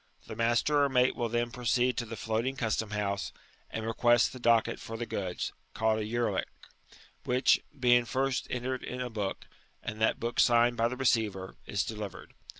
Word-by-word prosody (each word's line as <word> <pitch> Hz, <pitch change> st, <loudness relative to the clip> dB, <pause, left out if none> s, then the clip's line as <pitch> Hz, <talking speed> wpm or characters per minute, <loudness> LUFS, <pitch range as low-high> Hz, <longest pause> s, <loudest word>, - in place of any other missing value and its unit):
The 110 Hz, -, -7 dB
master 120 Hz, +6 st, +2 dB
or 140 Hz, -, +2 dB
mate 125 Hz, -1 st, +3 dB
wiU 120 Hz, -2 st, -2 dB
then 120 Hz, +1 st, -1 dB
pro 125 Hz, +1 st, -9 dB
ceed 125 Hz, +1 st, +2 dB
to 120 Hz, -, -2 dB
the 115 Hz, -, -6 dB
floatmg 115 Hz, +5 st, -2 dB
custom 110 Hz, -3 st, -1 dB
house, 100 Hz, -2 st, -2 dB, 0.4 s
and 110 Hz, -, -4 dB
request 120 Hz, +1 st, +3 dB
the 130 Hz, -, -8 dB
cocket 115 Hz, -2 st, +3 dB
for 115 Hz, -, -7 dB
the 120 Hz, -, -3 dB
goods 95 Hz, -5 st, -3 dB, 0.2 s
(called 110 Hz, 0 st, +2 dB
SLyerlick), 115 Hz, +2 st, -1 dB, 0.8 s
which, 125 Hz, +1 st, +3 dB, 0.2 s
being 120 Hz, -1 st, +5 dB
first 135 Hz, +1 st, -1 dB
entered 125 Hz, +1 st, -2 dB
in 125 Hz, -, -5 dB
a 125 Hz, -1 st, -3 dB
book, 105 Hz, -3 st, -3 dB, 0.4 s
and 110 Hz, -1 st, -5 dB
that 110 Hz, -, +2 dB
book 120 Hz, +1 st, -2 dB
signed 120 Hz, 0 st, +5 dB
by 115 Hz, 0 st, +2 dB
the 125 Hz, +2 st, -5 dB
receiver, 110 Hz, -7 st, 0 dB
is 100 Hz, -2 st, 0 dB
delivered. 105 Hz, -2 st, -7 dB
120 Hz, 180 wpm, -30 LUFS, 110-125 Hz, 0.8 s, being